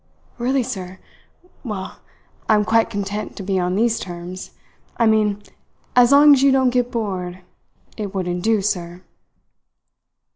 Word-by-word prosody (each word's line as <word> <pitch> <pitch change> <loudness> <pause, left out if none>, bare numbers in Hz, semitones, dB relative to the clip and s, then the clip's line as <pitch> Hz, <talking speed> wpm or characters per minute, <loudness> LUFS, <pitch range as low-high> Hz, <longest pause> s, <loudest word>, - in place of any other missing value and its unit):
"Really, 255 +2 +1
sir? 190 -7 -6 0.7
Well, 200 -6 -6 0.5
I 215 - +6
am 210 0 +2
quite 225 +1 +2
content 205 0 -4
to 195 - -7
be 190 0 0
on 180 0 -1
these 230 +2 +1
terms 175 +1 -7 0.5
I 230 - +3
mean 210 -2 +2 0.5
as 245 0 +6
long 290 +1 +8
as 270 - +3
you 275 0 +5
don't 260 -1 +3
get 245 -1 0
bored. 185 -6 -4 0.5
It 205 -2 -4
wouldn't 180 -2 -3
do, 220 0 +1
sir." 180 -3 -3
210 Hz, 145 wpm, -20 LUFS, 185-235 Hz, 0.7 s, long